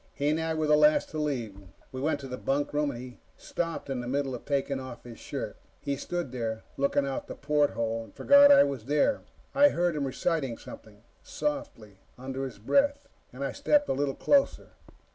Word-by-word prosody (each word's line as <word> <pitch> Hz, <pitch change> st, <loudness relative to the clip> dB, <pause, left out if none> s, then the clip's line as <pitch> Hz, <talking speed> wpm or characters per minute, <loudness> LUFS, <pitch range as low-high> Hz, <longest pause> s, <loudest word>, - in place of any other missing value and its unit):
He 145 Hz, +1 st, 0 dB
and 155 Hz, +1 st, +1 dB
I 160 Hz, 0 st, -1 dB
were 155 Hz, 0 st, 0 dB
the 150 Hz, 0 st, +5 dB
last 150 Hz, 0 st, +4 dB
to 155 Hz, -, -5 dB
leave. 120 Hz, -10 st, -3 dB, 0.3 s
We 130 Hz, -, -6 dB
went 155 Hz, +3 st, 0 dB
to 135 Hz, -, -7 dB
the 125 Hz, -, -5 dB
bunkroom, 145 Hz, +2 st, -1 dB
and 120 Hz, -4 st, -6 dB
he 125 Hz, 0 st, -10 dB, 0.2 s
stopped 165 Hz, -3 st, -4 dB
in 135 Hz, -2 st, -3 dB
the 120 Hz, -, -6 dB
middle 135 Hz, +1 st, -1 dB
of 125 Hz, -, -7 dB
taking 140 Hz, -1 st, -1 dB
off 130 Hz, -3 st, -9 dB
his 120 Hz, -2 st, -11 dB
shirt. -, -, -5 dB, 0.2 s
He 140 Hz, -, -2 dB
stood 170 Hz, 0 st, -4 dB
there, 115 Hz, -3 st, -3 dB
looking 140 Hz, 0 st, +1 dB
out 135 Hz, -1 st, -4 dB
the -, -, -7 dB
porthole, 125 Hz, -6 st, 0 dB
and -, -, -19 dB
forgot 285 Hz, 0 st, +7 dB
I 285 Hz, -, +8 dB
was 135 Hz, -5 st, -3 dB
there. 150 Hz, -, +2 dB, 0.3 s
I 290 Hz, +1 st, +6 dB
heard 175 Hz, -, 0 dB
him 140 Hz, -2 st, -1 dB
reciting 135 Hz, -3 st, -1 dB
something, 105 Hz, 0 st, -13 dB, 0.2 s
softly, 280 Hz, -, -5 dB, 0.2 s
under 135 Hz, +1 st, -4 dB
his 130 Hz, -, -8 dB
breath, 280 Hz, -, +1 dB, 0.2 s
and 130 Hz, +3 st, -6 dB
I 135 Hz, -, -2 dB
stepped 290 Hz, -, +2 dB
a -, -, +2 dB
little 140 Hz, 0 st, -1 dB
closer. 280 Hz, -1 st, +2 dB
140 Hz, 200 wpm, -28 LUFS, 125-155 Hz, 0.3 s, I